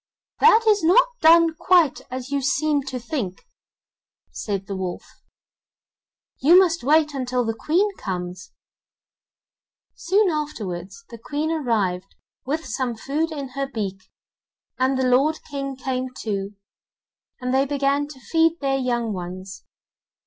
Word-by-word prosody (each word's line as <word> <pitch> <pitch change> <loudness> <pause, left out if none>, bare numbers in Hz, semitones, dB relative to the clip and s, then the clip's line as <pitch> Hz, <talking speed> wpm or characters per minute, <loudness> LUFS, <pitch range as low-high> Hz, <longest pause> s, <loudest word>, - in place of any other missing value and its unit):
'That 450 0 +6
is 415 -4 +4
not 375 +11 +5
done 330 0 +6
quite 340 -3 +3
as 255 +1 -6
you 280 -1 0
seem 290 +2 +1
to 265 -1 -5
think,' 230 - -4 0.9
said 195 -2 -4
the 195 - -5
wolf; 185 -2 -4 1.4
'you 330 +6 +7
must 345 -5 +3
wait 300 +2 +3
until 255 -2 -1
the 225 - -1
Queen 340 - +1
comes,' 180 -1 -5 1.4
Soon 390 +1 +2
afterwards, 225 - -5
the 235 - -9
Queen 295 +6 -2
arrived 220 - -1 0.3
with 315 +4 -2
some 250 -1 -2
food 295 +8 -2
in 280 -4 -5
her 275 +1 -3
beak, 200 -7 -5 0.7
and 260 +1 +2
the 260 - +1
lord 275 +6 +3
King 275 -1 -4
came 260 -1 -3
too, 200 -2 -3 0.8
and 250 0 -2
they 270 +1 +2
began 280 0 0
to 290 -3 -12
feed 325 +4 +1
their 270 -1 0
young 240 -4 -1
ones. 185 +1 -7
270 Hz, 135 wpm, -23 LUFS, 225-310 Hz, 1.4 s, you